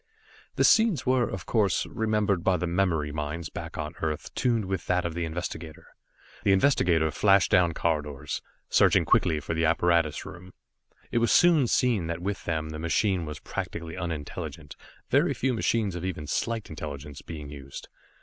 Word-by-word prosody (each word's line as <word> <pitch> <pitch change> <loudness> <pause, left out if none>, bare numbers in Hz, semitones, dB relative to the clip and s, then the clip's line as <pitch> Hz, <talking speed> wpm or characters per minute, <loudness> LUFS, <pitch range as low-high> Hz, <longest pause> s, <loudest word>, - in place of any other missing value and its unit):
The - - +2
scenes 220 -7 +4
were, 130 -2 +2
of 95 -4 -6
course, 105 -6 +1
remembered 105 -5 0
by 95 -1 +3
the 90 - -2
memory 85 -4 0
minds 75 +2 -4
back - - -7
on - - -4
Earth 75 -2 -3
tuned 115 -4 +1
with 95 -1 -3
that 90 -1 +1
of 85 - -2
the 85 0 -2
investigator. 80 -1 -6 0.5
The 100 - +4
investigator 90 - +3
flashed 100 +4 +3
down 85 -2 +4
corridors, 75 -3 -2 0.3
searching - - +4
quickly 80 -2 +3
for 75 - -4
the 80 0 +1
apparatus 85 -2 +2
room. 90 +1 -11 0.6
It 120 - +2
was 115 -1 +2
soon 165 -7 +5
seen 115 -9 +2
that 85 0 -3
with 100 +3 -4
them 80 -2 -2
the 80 0 -6
machine 85 +1 0
was 75 0 -6
practically 80 0 -5
unintelligent, 80 -4 -6 0.4
very - - +3
few 130 0 0
machines 110 -3 0
of 90 0 -5
even 90 -5 -4
slight 115 +8 -2
intelligence 75 -2 -7
being 75 -3 -8
used. 70 -2 -9
85 Hz, 170 wpm, -27 LUFS, 80-100 Hz, 0.6 s, soon